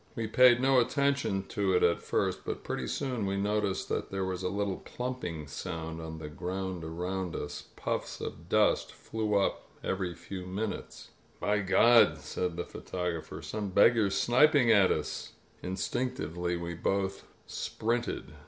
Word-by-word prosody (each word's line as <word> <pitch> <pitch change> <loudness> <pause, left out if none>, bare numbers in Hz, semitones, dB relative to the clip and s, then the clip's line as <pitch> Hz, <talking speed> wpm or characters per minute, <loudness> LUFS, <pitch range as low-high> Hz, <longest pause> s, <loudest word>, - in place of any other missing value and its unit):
We. 115 - -2
paid 120 +2 +6
no 130 0 +5
attention 140 -6 +1
to 100 -2 +1
it 90 - +3
at 85 -1 +3
first, - - -1
but - - -4
pretty - - -3
soon 125 -7 -2
we 100 0 -1
noticed 100 -1 0
that - - -2
there 95 -1 -2
was 95 -1 -3
a 90 - -1
little 100 0 -1
plumping 125 -12 -5
sound 80 +2 -5
on 80 0 -6
the 80 - -6
ground 90 +3 -4
around 90 +2 -3
us 75 - -5
— - - -32
^puffs - - -3
of 85 +2 -7
dust 105 +1 +3
flew 110 -2 -2
up 100 -1 0
every 95 -3 -2
few 95 +1 -7
minutes. 100 +3 -5 0.3
By 105 0 +1
God," 115 +4 +6
said 90 -2 -3
the 85 - -2
photographer. 90 -3 -4
"Some 105 -2 -3
beggar's 100 0 +4
sniping 125 +2 +5
at 100 -4 +6
us.'' 75 - -2 0.3
Instinctively 90 -4 -2
we 85 0 -4
both 95 +3 -1 0.2
sprinted. 120 +2 -2
95 Hz, 155 wpm, -30 LUFS, 90-110 Hz, 0.3 s, paid